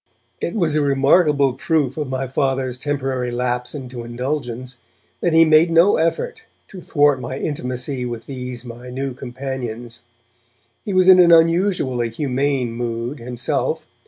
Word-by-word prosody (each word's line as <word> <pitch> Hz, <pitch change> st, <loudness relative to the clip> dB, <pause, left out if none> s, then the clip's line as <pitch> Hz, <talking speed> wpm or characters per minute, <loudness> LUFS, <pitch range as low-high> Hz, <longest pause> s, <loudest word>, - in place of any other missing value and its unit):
It -, -, -3 dB
was 170 Hz, -7 st, +1 dB
a 155 Hz, -, +2 dB
remarkable 140 Hz, 0 st, +3 dB
proof 140 Hz, 0 st, 0 dB
of 150 Hz, -4 st, -4 dB
my 130 Hz, 0 st, -2 dB
Father's 130 Hz, -1 st, -1 dB
temporary 135 Hz, -3 st, -2 dB
lapse 125 Hz, +1 st, -2 dB
into 125 Hz, -3 st, -7 dB
indulgence 125 Hz, 0 st, -4 dB, 0.4 s
that 175 Hz, -, 0 dB
he 165 Hz, 0 st, +6 dB
made 155 Hz, +2 st, +5 dB
no 165 Hz, +4 st, +4 dB
effort 165 Hz, -, -1 dB, 0.3 s
to 185 Hz, -, -10 dB
thwart 145 Hz, -5 st, +2 dB
my 130 Hz, +2 st, -5 dB
intimacy 130 Hz, -2 st, -3 dB
with 120 Hz, -2 st, -5 dB
these 125 Hz, -2 st, -7 dB
my 120 Hz, +1 st, -9 dB
new 135 Hz, +1 st, -4 dB
companions. 120 Hz, -2 st, -6 dB, 0.8 s
He 205 Hz, -, -4 dB
was 185 Hz, -1 st, +3 dB
in 185 Hz, -1 st, +8 dB
an 175 Hz, -1 st, +6 dB
unusually 165 Hz, -, +3 dB
humane 135 Hz, 0 st, -1 dB
mood 120 Hz, +3 st, -4 dB
himself. 120 Hz, 0 st, -2 dB
130 Hz, 145 wpm, -20 LUFS, 125-150 Hz, 0.8 s, in